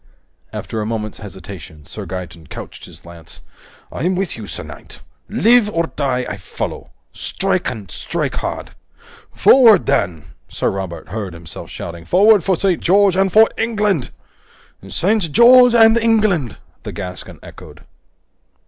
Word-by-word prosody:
After 110 - -5
a - - -3
moment's 110 -2 -4
hesitation, 95 -7 -11
Sir 100 +4 -9
Gaeton 85 -3 -8
couched - - -9
his - - -16
lance. 85 -1 -14 0.5
"I'm 180 +3 -1
with 190 -1 -2
you, 110 -3 -9
sir - - -6
knight! - - -12 0.3
Live 235 -1 +4
or 165 -4 -2
die, 130 -3 -1
I 100 - -5
follow! 95 - -6 0.2
Strike - - -2
and 105 -7 -8
strike - - -3
hard!" - - -5 0.6
"Forward 230 - +6
then!" 80 -7 -1 0.2
Sir - - -1
Robert 95 -3 -6
heard 100 -5 -5
himself 85 -1 -11
shouting. 85 -1 -8
"Forward 205 +1 +4
for 190 - +1
St. 185 0 0
George 195 +1 +3
and 190 0 +2
for 220 +3 +6
England!" 210 - 0 0.8
"St. 185 - 0
George 245 - +7
and 225 -1 +6
England!" 215 - +1 0.2
the - - -7
Gascon 90 -1 -8
echoed. - - -13
145 Hz, 140 wpm, -18 LUFS, -, 0.8 s, George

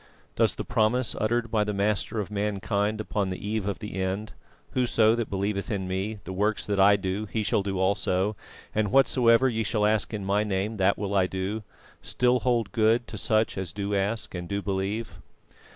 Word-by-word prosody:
Does - - +2
the - - -5
promise 120 +1 +1
uttered 115 +1 0
by 110 -3 +2
the 105 -1 -3
Master 105 +2 0
of 105 -1 -4
mankind 105 +1 -1
upon 105 -2 -1
the 95 - -3
eve 105 -2 -1
of 100 - -2
the 105 -2 -7
end 95 +3 -3 0.4
"Whoso 115 -3 +3
that 115 -2 -2
believeth 100 0 -2
in 95 -3 -2
Me, 95 +4 -2
the 95 - -6
works 105 +3 0
that 100 -1 -1
I 100 +1 +7
do 100 +2 -3
he 110 +1 -2
shall 100 0 +1
do 95 -1 -3
also... 95 +1 +1 0.4
and 105 -2 0
whatsoever 125 -1 +5
ye 115 -3 0
shall 105 0 0
ask 105 -1 +1
in 105 -3 -4
My 100 +2 +2
name, 105 +1 -2
that 95 0 +3
will 100 -1 -3
I 95 -2 +3
do;" 95 +4 -3 0.4
still 125 0 +1
hold 120 -4 0
good 115 0 +2
to 110 - -6
such 110 -2 +1
as 95 -3 -4
do 100 +2 -3
ask 100 +3 -1
and 90 -1 -6
do 100 0 -1
believe? 100 0 -3
105 Hz, 200 wpm, -27 LUFS, 100-110 Hz, 0.4 s, I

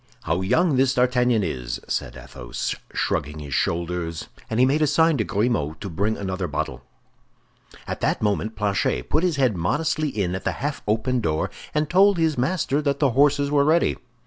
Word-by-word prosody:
"How 80 +3 0
young 150 - +2
this 130 0 +3
D'Artagnan 125 -3 +2
is!" 60 -8 -3
said 60 +1 -3
Athos, - - -5 0.2
shrugging 75 +3 -2
his 75 -3 -7
shoulders; 85 0 -2 0.2
and 110 - -1
he 125 - +6
made 145 +4 +2
a 155 - +4
sign 160 +2 +3
to 110 - +1
Grimaud 100 -6 -1
to 100 - -6
bring 100 +6 -1
another 95 -2 -3
bottle. 75 - -3 1.0
At - - -5
that - - +1
moment 105 +1 -1
Planchet 100 - -1
put - - +3
his 180 -3 +1
head 130 -6 +2
modestly 150 - 0
in 100 -8 -2
at 95 - -4
the - - -1
half 145 +2 -4
open 115 +4 +1
door, 80 -7 -1 0.2
and 150 0 +1
told 195 +3 +4
his 160 -2 +2
master 145 +1 0
that 140 -2 0
the 140 -3 +2
horses 140 +2 +3
were 145 -1 +4
ready. 160 +4 +3
120 Hz, 185 wpm, -23 LUFS, 90-145 Hz, 1.0 s, he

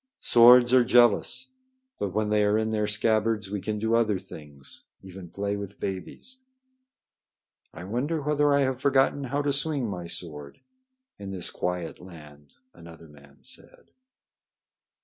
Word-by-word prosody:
"Swords 120 +1 +6
are 130 -1 +6
jealous. 120 - +3 0.5
But 100 - -2
when 105 +2 -1
they 105 0 +3
are 105 +1 +2
in 110 0 -1
their 105 -1 -1
scabbards, 110 -1 0
we 105 -2 -3
can 105 +1 -3
do 110 +2 -1
other 110 -4 +2
things, 75 -7 -11 0.2
even 95 -2 -11
play 100 +2 -3
with 100 0 -8
babies." 95 - -7 1.3
"I 80 - -10
wonder 125 - -2
whether 150 0 +1
I 140 0 +3
have 130 -2 -1
forgotten 140 0 +2
how 140 +3 -2
to 145 -1 0
swing 140 -3 -1
my 90 -4 -6
sword 75 -5 -7 0.6
in 100 -1 -8
this 95 -3 -4
quiet 90 -2 -4
land," 75 -5 -15 0.2
another 85 -1 -14
man 70 -1 -20
said. - - -14
105 Hz, 150 wpm, -26 LUFS, 90-125 Hz, 1.3 s, Swords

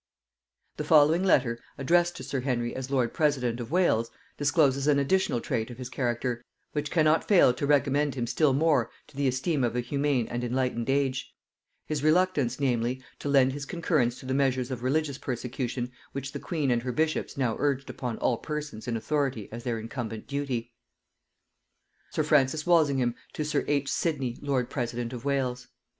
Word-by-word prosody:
The - - -2
following 155 +3 +5
letter, 125 -10 +3 0.2
addressed 175 +5 +2
to - - -7
sir 135 - -2
Henry 120 -2 -1
as 130 0 -5
lord 130 -4 +1
president 130 -7 +1
of 120 -1 -5
Wales, 155 -10 +2 0.3
discloses 145 -2 +2
an 145 -1 +4
additional 140 -1 +2
trait 115 0 -2
of 120 - -9
his 125 -1 -6
character, 120 -1 -2 0.3
which 150 -1 -2
cannot 155 -1 +3
fail 185 -11 +6
to 140 +3 -2
recommend 145 0 +2
him 120 -3 -1
still 145 +4 +2
more 140 -4 +2 0.2
to - - -20
the 140 0 +1
esteem 130 +3 0
of 120 -1 0
a - - +1
humane 140 0 0
and 120 0 -3
enlightened 125 -1 -1
age; 135 -1 0 0.5
his 150 -2 -2
reluctance, 155 -6 +2
namely, 125 -1 0 0.2
to 145 - -3
lend 135 -2 +4
his 145 0 -6
concurrence 155 -9 0
to - - -11
the 130 - -1
measures 130 -2 +1
of 125 -2 -4
religious 140 +2 0
persecution 125 0 -3 0.2
which 140 0 -4
the - - -5
queen 150 -7 -1
and 120 -1 +2
her 125 +1 -3
bishops 155 +2 -1
now 125 -5 +1
urged 140 -2 0
upon 120 -3 -4
all 120 - +1
persons 150 -7 -5
in 115 -1 -1
authority 130 -2 -1
as 115 +1 -7
their 120 -2 -1
incumbent 115 -1 -5
duty. 130 -4 -3 1.4
Sir - - 0
Francis 150 +1 +2
Walsingham 140 -8 +3 0.2
to 155 - -3
sir 150 -1 0
H. 140 -1 +1
Sidney 135 -7 -1
lord 135 -4 0
president 120 -2 -3
of 125 +1 -7
Wales. 130 -3 -1
135 Hz, 180 wpm, -28 LUFS, 120-145 Hz, 1.4 s, fail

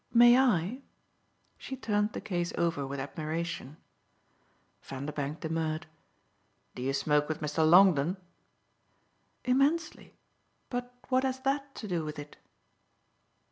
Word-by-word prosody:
"May 240 +1 +8
I?" 245 -2 +2 0.8
She 265 - -6
turned 210 -3 0
the - - -5
case 175 -4 -2
over 165 -5 0
with 140 0 -5
admiration. 155 +1 -4 1.0
Vanderbank 145 +2 -5
demurred. 160 0 -2 0.9
"Do - - -7
you 130 +2 0
smoke 150 +2 +1
with 155 - -2
Mr. 155 +1 +1
Longdon?" 180 -1 +6 1.3
"Immensely. 280 +6 +1 0.6
But 245 0 -3 0.2
what 260 0 +3
has 260 0 -1
that 275 +1 -1
to 215 - -6
do 175 -4 -1
with 150 0 -6
it?" 145 0 -9
170 Hz, 115 wpm, -30 LUFS, 150-245 Hz, 1.3 s, May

